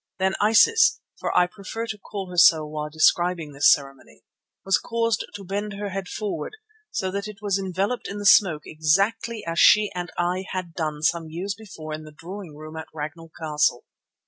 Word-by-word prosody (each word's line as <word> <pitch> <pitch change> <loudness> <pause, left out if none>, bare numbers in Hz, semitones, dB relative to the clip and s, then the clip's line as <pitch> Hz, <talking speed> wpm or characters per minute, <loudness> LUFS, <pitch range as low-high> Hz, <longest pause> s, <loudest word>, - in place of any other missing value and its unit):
Then 190 0 +1
Isis, 450 - +5 0.2
for - - -1
I 180 - +6
prefer 200 +5 -6
to 220 -2 -5
call 195 -2 -7
her - - -7
so 165 -2 +6
while 150 0 -5
describing 165 +1 +2
this 145 +1 +5
ceremony, 135 -1 -2 0.4
was 195 - +3
caused 230 -2 -1
to 200 - -7
bend 205 +2 -3
her 205 +1 -4
head 195 -1 -4
forward, 210 - -4 0.4
so 190 -1 -2
that 200 +2 -3
it 210 -1 -9
was 200 -2 0
enveloped 195 +5 -2
in 200 - -6
the 205 - -5
smoke 175 -6 +5
exactly 205 +8 0
as 165 0 -2
she 210 -1 +6
and 175 -1 -4
I 180 +2 -1
had 185 -3 -4
done 155 -2 -3
some 165 +1 +1
years 180 +5 -3
before 190 -7 -9
in 155 0 -6
the 155 - -12
drawing 170 +1 -9
room 155 +1 -10
at 160 - -7
Ragnall 160 +2 -6
Castle. 150 -5 0
185 Hz, 190 wpm, -24 LUFS, 155-205 Hz, 0.4 s, I